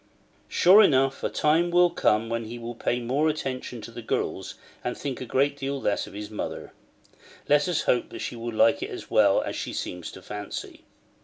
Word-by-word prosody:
Sure 190 +5 +7
enough 135 -8 +3
a - - +1
time 160 +3 +2
will 175 0 +4
come 110 +1 +2
when 115 0 -2
he 115 +2 -7
will 120 0 -6
pay 120 +1 -1
more 135 +6 +1
attention 130 -5 -4
to 110 - -9
the 120 +1 -8
girls, 110 - -3 0.3
and 125 - -3
think 135 -3 -4
a - - -4
great 140 +3 +2
deal 140 0 -3
less 105 -5 -1
of - - -12
his 105 +1 -7
mother: 105 - -5 0.7
let 145 +2 +4
us 175 -3 0
hope 120 - +1
she - - -4
will 120 0 -5
like 140 +6 +3
it - - -3
as - - -8
well - - +4
as - - -4
she - - -4
seemed 90 -2 -5
to 95 - -8
fancy. 105 -1 -7
125 Hz, 205 wpm, -26 LUFS, 115-145 Hz, 0.7 s, Sure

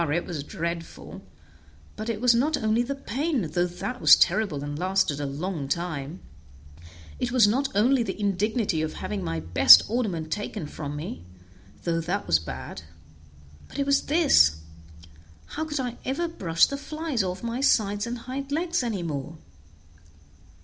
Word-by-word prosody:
it 170 +3 0
was 160 -5 -5
dreadful; 170 +2 -6 0.7
but 215 +2 -5
it 220 -2 -2
was 245 0 +4
not 290 +6 +1
only 220 +2 +1
the 265 +3 -3
pain, 275 - -2
though 175 0 +1
that 245 +8 -6
was - - +9
terrible 185 -10 +1
and 145 +1 -5
lasted 185 -5 +1
a 145 - -2
long 150 +1 -4
time; 160 0 -3 1.0
it 245 - -2
was 240 -4 +5
not 270 +6 +1
only 245 +5 +3
the 225 - -4
indignity 205 -2 0
of 155 0 -3
having 100 -3 -4
my 80 -1 -3
best 85 +3 +8
ornament 195 -9 -2
taken 205 -1 -4
from 145 -1 -6
me, 145 - -6 0.6
though 165 -1 0
that 185 +5 -2
was 80 - +3
bad; 65 -5 -7 0.9
but - - -11
it 280 - 0
was 280 0 +1
this, 80 - +4 0.8
how 315 - -5
could 300 -2 -3
I 245 -2 -3
ever 285 +7 -1
brush 170 - +2
the 280 - -4
flies 305 -3 -3
off 185 +1 -4
my 235 +2 -3
sides 205 -5 +2
and 240 - -3
my 235 - -10
hind 275 +2 -6
legs 340 +2 0
any 220 -7 -3
more? 160 0 -5
205 Hz, 165 wpm, -26 LUFS, 160-255 Hz, 1.0 s, was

